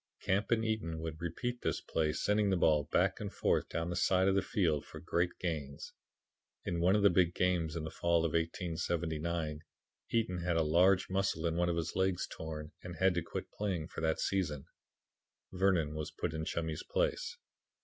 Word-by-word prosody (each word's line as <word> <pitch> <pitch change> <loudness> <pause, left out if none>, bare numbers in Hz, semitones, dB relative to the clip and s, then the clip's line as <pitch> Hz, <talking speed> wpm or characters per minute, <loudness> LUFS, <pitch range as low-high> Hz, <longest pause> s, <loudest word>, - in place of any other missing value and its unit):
Camp 100 +3 +1
and 115 -1 +2
Eaton 105 -8 -1
would 80 0 -5
repeat 120 +9 -3
this - - 0
play, 75 -1 0
sending 105 +4 +1
the 95 - +2
ball 75 -3 +3
back - - +1
and - - -4
forth - - +1
down 85 +1 -2
the - - -2
side 95 +1 +3
of 95 - +4
the 100 - +3
field 85 -8 +1
for 80 - -10
great 85 +1 +1
gains. 75 -5 -4 0.7
"In 85 -1 -1
one 90 +3 +4
of 105 - +2
the 100 - +7
big 90 -1 +3
games 85 -3 +1
in 80 - -3
the 80 - -5
fall 85 0 +2
of 80 - 0
1879, 80 -1 -1 0.5
Eaton 110 -6 0
had 85 -1 0
a 80 - +3
large 90 +5 +4
muscle 95 -4 0
in 85 -1 +1
one 85 +1 +2
of 85 - 0
his 80 -1 -2
legs 95 -1 +1
torn 75 -1 -7
and 90 -1 -7
had 95 +3 +3
to 85 - 0
quit - - -6
playing 90 -6 -2
for - - -6
that 80 -1 +1
season." 85 -8 -1 0.9
Vernon 90 -5 +2
was 75 -1 -4
put 85 - -3
in 80 0 -3
Chummy's 80 -2 -2
place. - - -1
85 Hz, 195 wpm, -33 LUFS, 80-95 Hz, 0.9 s, the